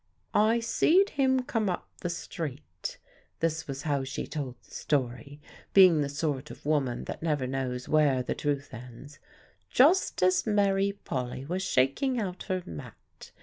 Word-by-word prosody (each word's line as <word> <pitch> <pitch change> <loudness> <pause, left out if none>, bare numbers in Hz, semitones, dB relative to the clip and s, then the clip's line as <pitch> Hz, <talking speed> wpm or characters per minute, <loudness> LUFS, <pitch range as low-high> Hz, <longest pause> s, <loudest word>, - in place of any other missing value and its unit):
"I 220 +3 +4
see'd 340 - +3
him 260 -2 +2
come 225 -5 -1
up 180 - -3
the 175 - -3
street" 165 - -6 0.4
this 160 0 -1
was 140 0 -5
how 145 -3 0
she 130 - -4
told 140 -5 -5
the - - -24
story, 140 0 -2 0.4
being 185 -5 +8
the 140 - -1
sort 145 -2 -2
of - - -12
woman 140 -5 0
that - - -6
never 150 -5 0
knows 125 -1 -3
where 145 -4 +3
the - - -2
truth 140 -1 -2
ends 125 +4 -11 0.5
"just 310 - +4
as 185 +4 +3
Mary 200 -1 +2
Polly 130 0 -3
was 180 +5 -2
shaking 190 - +1
out 185 -4 -4
her 185 -1 -1
mat. 75 -3 -11
155 Hz, 155 wpm, -29 LUFS, 135-195 Hz, 0.5 s, being